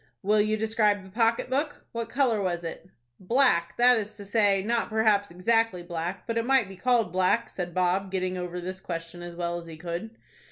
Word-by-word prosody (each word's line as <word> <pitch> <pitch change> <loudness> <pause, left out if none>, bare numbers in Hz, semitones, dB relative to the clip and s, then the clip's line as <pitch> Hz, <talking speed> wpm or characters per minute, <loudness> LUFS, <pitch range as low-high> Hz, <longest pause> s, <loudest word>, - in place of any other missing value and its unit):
"Will 210 +2 +4
you 215 +1 +1
describe 215 -2 +1
the 190 - -14
pocket 230 +3 +1
book? 285 +4 -2
What 230 -1 -4
color 245 -4 +1
was 175 -2 -2
it?" 170 +2 -7 0.3
"Black, 190 -5 +2
that 245 0 +6
is 215 0 -5
to 205 - -9
say, 200 -2 +2
not 235 +2 0
perhaps 215 -2 +2
exactly 205 +1 +1
black, 175 +1 -4
but 230 0 -1
it - - -1
might 260 -3 +3
be 195 - -10
called 230 -2 +1
black," 185 +5 +2
said 175 -2 -5
Bob, 185 +2 +1
getting 185 -1 -2
over 180 0 -4
this 185 +2 -6
question 170 0 -6
as 175 0 -8
well 175 0 -2
as 170 - -12
he 160 -1 -9
could. 175 +7 -6
200 Hz, 205 wpm, -27 LUFS, 180-225 Hz, 0.3 s, that